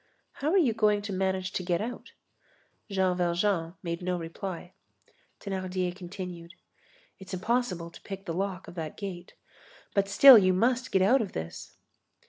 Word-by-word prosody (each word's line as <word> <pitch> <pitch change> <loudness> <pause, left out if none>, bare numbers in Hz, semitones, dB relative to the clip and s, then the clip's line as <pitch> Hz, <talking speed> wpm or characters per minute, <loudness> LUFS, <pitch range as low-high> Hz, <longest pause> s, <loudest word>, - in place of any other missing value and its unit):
"How 285 - -3
are 380 - +3
you 280 -11 +3
going 210 -2 +2
to 205 -1 -4
manage 190 0 -1
to - - -2
get 175 -1 0
out?" 235 +3 -6 0.8
Jean 190 -2 +1
Valjean 175 -1 0
made 170 0 -3
no 180 0 -1
reply. 175 +2 -6 0.7
Thénardier 185 -2 -3
continued: 180 -2 -8 0.6
"It's 190 0 -6
impossible 185 -5 -1
to - - -14
pick 195 0 -8
the 170 - -3
lock 190 +1 -3
of - - -9
that 160 -3 -6
gate. 180 -4 -7 0.6
But 200 0 +1
still 260 +3 +10
you 185 -2 +3
must 245 +6 +1
get 190 - +3
out 250 +8 +4
of 205 - -4
this." 80 0 -7
185 Hz, 160 wpm, -28 LUFS, 175-205 Hz, 0.8 s, still